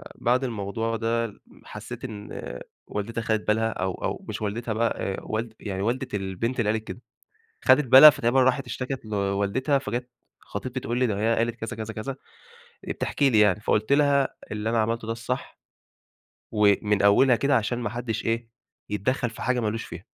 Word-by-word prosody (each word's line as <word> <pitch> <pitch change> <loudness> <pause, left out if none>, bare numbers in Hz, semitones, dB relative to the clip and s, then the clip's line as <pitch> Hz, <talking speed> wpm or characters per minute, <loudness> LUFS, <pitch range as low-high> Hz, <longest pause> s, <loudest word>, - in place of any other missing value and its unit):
بعد 125 +3 +1
الموضوع 115 0 -2
ده 115 -1 -1 0.2
حسيت 110 +4 -9
إن 105 -3 -7 0.5
والدتها 115 +3 -3
أخدت 110 -1 -1
بالها 110 +1 +2
أو 95 -1 -2
أو - - -4
مش - - -5
والدتها 110 +2 -2
بقى، 115 +1 0
آآ 95 - -2
والد 110 +1 -3
يعني 95 -2 -4
والدة 120 +5 -1
البنت 105 +6 -2
اللي 105 -2 +1
قالت 110 0 -2
كده. 120 - -7 0.6
أخدت 150 - +6
بالها 135 +5 +11
فتقريبًا 130 -1 +2
راحت 130 +1 +2
اشتكت 130 -1 -5
لوالدتها، 100 +7 0
فجات 125 0 -4 0.3
خطيبتي - - -5
تقول 120 +2 -3
لي 125 - +3
ده 100 -2 -1
هي 115 +2 +2
قالت 115 0 0
كذا، 115 -1 -6
كذا، 110 0 -5
كذا، 110 +6 -4 0.8
آآ - - 0
بتحكي 140 -2 +1
لي 110 -2 +4
يعني، 105 -1 +4
فقلت 110 +4 +1
لها: 140 -1 +4 0.2
"اللي 105 +1 -2
أنا 115 - +1
عملته 115 0 0
ده 115 - -1
الصح. 125 +3 -5 0.9
ومن 105 -1 +3
أولها 120 +5 +5
كده 140 +3 +2
عشان 120 +1 0
ما 120 - -2
حدش 120 -2 -4
إيه، 115 0 -1 0.4
يتدخل 115 +4 0
في 115 - -11
حاجة 125 -1 +1
ما 110 - 0
لوش 115 +2 -2
فيها." - - -9
115 Hz, 180 wpm, -25 LUFS, 105-125 Hz, 0.9 s, بالها